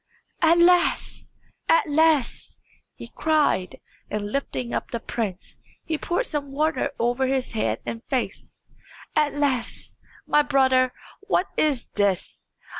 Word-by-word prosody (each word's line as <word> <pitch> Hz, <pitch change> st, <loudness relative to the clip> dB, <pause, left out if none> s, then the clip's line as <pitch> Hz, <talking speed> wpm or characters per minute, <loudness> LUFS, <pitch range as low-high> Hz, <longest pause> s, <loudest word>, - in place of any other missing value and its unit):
"Alas! 345 Hz, +2 st, +3 dB, 0.4 s
alas!" 320 Hz, -, +2 dB, 0.4 s
he -, -, -9 dB
cried, 300 Hz, -, +1 dB, 0.3 s
and 205 Hz, 0 st, -3 dB
lifting 255 Hz, -2 st, -3 dB
up -, -, -2 dB
the 235 Hz, -, -3 dB
prince, 210 Hz, -5 st, -5 dB, 0.3 s
he 325 Hz, -, -1 dB
poured 345 Hz, +10 st, -1 dB
some 290 Hz, -7 st, -3 dB
water 310 Hz, +3 st, 0 dB
over 245 Hz, +3 st, +1 dB
his 265 Hz, -1 st, -1 dB
head 220 Hz, -, -1 dB
and 230 Hz, +1 st, -5 dB
face. 260 Hz, -3 st, -4 dB, 0.5 s
"Alas! 290 Hz, -4 st, -1 dB, 0.3 s
my 295 Hz, -, +4 dB
brother, 260 Hz, -3 st, +3 dB, 0.4 s
what 380 Hz, -2 st, +1 dB
is 285 Hz, -6 st, +1 dB
this? 200 Hz, -3 st, -1 dB
275 Hz, 115 wpm, -24 LUFS, 240-310 Hz, 0.5 s, my